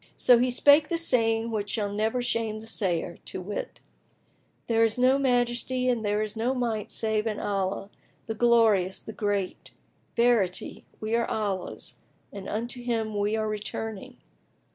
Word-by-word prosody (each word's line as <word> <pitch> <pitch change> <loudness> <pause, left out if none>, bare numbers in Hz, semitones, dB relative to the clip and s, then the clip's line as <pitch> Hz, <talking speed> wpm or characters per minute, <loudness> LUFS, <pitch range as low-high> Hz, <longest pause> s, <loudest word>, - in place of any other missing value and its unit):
So 245 -2 +6
he 250 +1 +2
spake 290 +4 +5
the 335 - +1
saying 230 -7 +2
which 205 -2 -2
shall 205 -1 -2
never 220 +4 0
shame 225 -3 -1
the 220 - -10
sayer, 185 -6 -2
to - - -4
wit, 195 +3 -6 0.8
"There 230 -1 +3
is 225 0 +1
no 255 +2 +4
Majesty 250 0 +1
and 240 -3 0
there 210 +1 +1
is 215 +1 -6
no 240 +4 0
Might 230 -4 -2
save 220 0 -1
in 215 -2 -2
Allah, 195 0 -2 0.3
the 225 - -3
Glorious, 220 -5 +3
the 220 - -8
Great! 205 -3 -2 0.5
Verity, 230 -6 +1
we 215 +1 -3
are 235 0 +1
Allah's 200 -4 -3 0.4
and 200 -1 -7
unto 240 +3 -3
Him 225 -3 -2
we 205 +1 +1
are 220 -1 -1
returning! 215 0 -5
220 Hz, 160 wpm, -27 LUFS, 205-240 Hz, 0.8 s, So